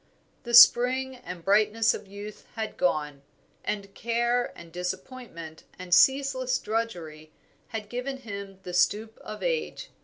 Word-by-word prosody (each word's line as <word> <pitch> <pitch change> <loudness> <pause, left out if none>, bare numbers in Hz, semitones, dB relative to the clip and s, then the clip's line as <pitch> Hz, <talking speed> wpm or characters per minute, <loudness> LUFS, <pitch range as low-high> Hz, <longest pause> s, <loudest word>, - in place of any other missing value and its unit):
The 240 0 +2
spring 255 +2 +7
and 180 -8 -9
brightness 215 +3 +3
of 205 - -8
youth 205 +2 -10
had 220 -1 -4
gone, 150 -5 -1 0.4
and 200 -1 -4
care 240 +1 0
and 170 -1 -12
disappointment 180 -2 -7
and 180 -1 -4
ceaseless 260 +3 +4
drudgery 170 -9 -4 0.4
had 220 -2 -6
given 250 +4 -4
him 200 -5 -8
the 180 - -7
stoop 210 +5 +1
of 215 - -8
age. - - -3
215 Hz, 130 wpm, -27 LUFS, 180-245 Hz, 0.4 s, spring